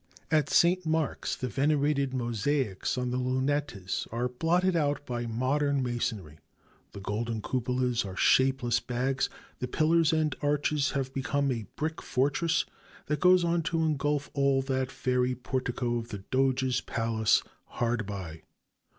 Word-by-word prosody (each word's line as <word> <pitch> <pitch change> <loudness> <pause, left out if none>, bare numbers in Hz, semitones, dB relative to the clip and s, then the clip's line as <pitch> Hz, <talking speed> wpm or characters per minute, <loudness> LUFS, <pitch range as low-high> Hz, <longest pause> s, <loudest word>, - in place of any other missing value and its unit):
At 155 -3 +3
St. 180 +2 +4
Mark's... 160 -2 -1
the 130 - -3
venerated 140 +2 +1
mosaics 120 -2 -1
on 125 -1 -1
the 125 - -1
lunettes 130 -6 -1
are 120 +2 -1
blotted 170 +8 +1
out 145 -2 0
by 120 -2 -3
modern 135 +4 +1
masonry, 105 -10 -3 0.5
the - - -7
golden 110 +3 -2
cupolas 125 +1 0
are 95 -2 -7
shapeless 130 -3 +3
bags, 130 +2 -1 0.3
the 125 - -2
pillars 160 +4 +3
and 155 -3 +1
arches 145 0 +1
have 135 -1 -2
become 140 +1 0
a 115 -5 -3
brick 155 +1 -3
fortress 145 +5 +1 0.4
that 150 -1 -1
goes 180 +1 +5
on 170 0 +1
to 165 0 0
engulf 145 -1 0
all 140 -1 +2
that 130 -1 -1
fairy 125 0 0
portico 125 -1 -2
of 115 - -7
the 100 -5 -7
Doges' 130 -1 +2
Palace 115 -1 +1 0.2
hard 115 -3 -2
by. 90 -6 -6
130 Hz, 140 wpm, -29 LUFS, 120-145 Hz, 0.5 s, goes